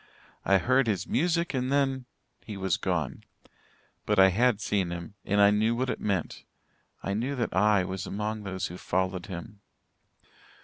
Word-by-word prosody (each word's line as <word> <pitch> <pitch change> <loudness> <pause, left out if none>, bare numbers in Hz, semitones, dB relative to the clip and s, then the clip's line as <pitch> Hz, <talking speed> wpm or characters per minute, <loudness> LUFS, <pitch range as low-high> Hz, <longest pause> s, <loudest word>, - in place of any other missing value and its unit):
I 100 - +5
heard 130 +7 +2
his 105 -4 0
music, 170 +2 0
and 130 0 -1
then 135 -2 +1 0.4
he 105 -3 -7
was 95 -2 0
gone. 80 -7 -2 0.8
But 105 - +2
I 95 0 +8
had 115 +3 +2
seen 100 -4 0
him 85 +2 -6
and 100 +1 +1
I 100 0 +7
knew 110 +3 +2
what 125 +1 0
it - - -5
meant 95 -6 -2 0.6
I 95 - -1
knew 125 +7 -1
that 120 -6 -2
I 105 0 +4
was 95 +1 -4
among 105 +1 -3
those 95 -2 -4
who 90 - -6
followed 95 0 -1
him. 100 +3 -8
105 Hz, 170 wpm, -28 LUFS, 95-120 Hz, 0.8 s, I